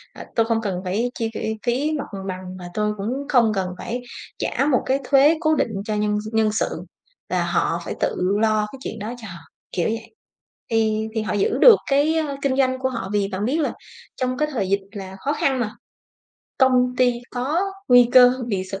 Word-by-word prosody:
"Ờ, -, -, -9 dB
tôi 225 Hz, -, +3 dB
không 225 Hz, 0 st, 0 dB
cần 190 Hz, -4 st, -3 dB
phải 215 Hz, +7 st, -1 dB
chi, 225 Hz, -1 st, 0 dB
ơ, -, -, -3 dB, 0.3 s
phí 260 Hz, +6 st, +1 dB
mặt -, -, -3 dB, 0.2 s
bằng 185 Hz, -1 st, -4 dB, 0.2 s
và 175 Hz, -1 st, -8 dB
tôi 210 Hz, +1 st, 0 dB
cũng 200 Hz, +2 st, -3 dB, 0.2 s
không 235 Hz, -4 st, +4 dB
cần 190 Hz, -2 st, -1 dB
phải 245 Hz, +6 st, -4 dB, 0.4 s
trả 275 Hz, -, 0 dB
một 250 Hz, -, +2 dB
cái 270 Hz, +1 st, +1 dB
thuế 285 Hz, +4 st, +5 dB
cố 315 Hz, -1 st, +3 dB
định 230 Hz, -, 0 dB
cho 215 Hz, -2 st, -2 dB
nhân 210 Hz, 0 st, 0 dB
s 215 Hz, -, -7 dB
nhân 220 Hz, -1 st, +3 dB
sự, 220 Hz, -, 0 dB, 0.6 s
là -, -, +1 dB
họ -, -, 0 dB
phải -, -, -3 dB
tự -, -, 0 dB, 0.3 s
lo 215 Hz, -1 st, +2 dB
cái 270 Hz, -, -10 dB
chuyện 220 Hz, -, -5 dB
đó 215 Hz, +4 st, -5 dB
cho 220 Hz, -, -8 dB
họ" 170 Hz, -3 st, -9 dB, 0.3 s
kiểu 175 Hz, -, 0 dB
vậy. 225 Hz, 0 st, -5 dB, 0.6 s
Thì 220 Hz, -1 st, +1 dB
thì 220 Hz, -, +1 dB
họ 200 Hz, -, -2 dB
giữ 205 Hz, -1 st, +1 dB
được 480 Hz, -3 st, +9 dB, 0.2 s
cái, 290 Hz, +3 st, +3 dB
ơ, 290 Hz, -3 st, -2 dB
kinh 270 Hz, -2 st, +1 dB
doanh 260 Hz, -1 st, +2 dB
của 260 Hz, 0 st, 0 dB
họ, 235 Hz, -7 st, -5 dB
vì 205 Hz, -1 st, +1 dB
bạn 195 Hz, +2 st, -3 dB
biết 280 Hz, +7 st, 0 dB
là 300 Hz, -, 0 dB, 0.4 s
trong 255 Hz, 0 st, -1 dB
cái 300 Hz, -, +1 dB
thời 200 Hz, -9 st, -2 dB
dịch 200 Hz, 0 st, +2 dB
là 190 Hz, -3 st, -8 dB
khó 285 Hz, -, +1 dB
khăn 270 Hz, -3 st, 0 dB
mà, 220 Hz, -3 st, -1 dB, 0.9 s
công 250 Hz, -1 st, +3 dB
ty 250 Hz, -1 st, +4 dB, 0.2 s
có 265 Hz, +7 st, -1 dB, 0.3 s
nguy 245 Hz, -1 st, +7 dB
cơ 250 Hz, -1 st, +8 dB, 0.2 s
bị 195 Hz, -4 st, -1 dB
sụp 195 Hz, +1 st, -6 dB
230 Hz, 220 wpm, -22 LUFS, 210-260 Hz, 0.9 s, được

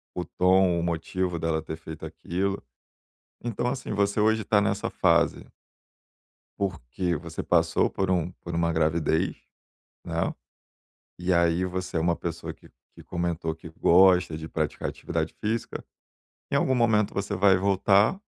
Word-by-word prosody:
o 90 Hz, -, -3 dB
tom, 90 Hz, -1 st, +3 dB
o -, -, -2 dB
motivo 85 Hz, +1 st, -2 dB
dela 80 Hz, -1 st, -1 dB
ter 80 Hz, 0 st, -6 dB
feito 80 Hz, -1 st, -10 dB
aquilo, 95 Hz, +3 st, -3 dB, 0.8 s
então 120 Hz, +1 st, -1 dB
assim, 125 Hz, -3 st, -4 dB
você 100 Hz, 0 st, +1 dB
hoje 110 Hz, +1 st, +3 dB
está 105 Hz, 0 st, +3 dB
nessa 100 Hz, -, -1 dB
fase -, -, +2 dB, 1.1 s
Porque 90 Hz, -2 st, -2 dB
você 80 Hz, +1 st, -7 dB
passou -, -, +2 dB
por 95 Hz, -1 st, -2 dB
um 90 Hz, -1 st, 0 dB
por 85 Hz, -, -6 dB
uma 85 Hz, 0 st, +1 dB
gravidez, 80 Hz, +2 st, +1 dB, 0.7 s
né, -, -, -1 dB, 0.9 s
e 90 Hz, +1 st, 0 dB
aí 85 Hz, +1 st, +3 dB
você 95 Hz, 0 st, -4 dB
é -, -, +2 dB
uma 85 Hz, +1 st, +2 dB
pessoa 85 Hz, 0 st, -5 dB
que -, -, -19 dB, 0.2 s
que -, -, -13 dB
comentou 85 Hz, -2 st, -2 dB
que 80 Hz, +1 st, -11 dB
gosta 90 Hz, 0 st, +4 dB
de 80 Hz, 0 st, -7 dB
praticar 80 Hz, -2 st, -2 dB
atividade -, -, -3 dB
física, 110 Hz, +2 st, -2 dB, 0.7 s
em -, -, +1 dB
algum 130 Hz, -, +2 dB
momento 110 Hz, -4 st, +2 dB
você 100 Hz, +1 st, -2 dB
vai 95 Hz, 0 st, +5 dB
voltar, 100 Hz, -, +3 dB
90 Hz, 145 wpm, -26 LUFS, 85-100 Hz, 1.1 s, vai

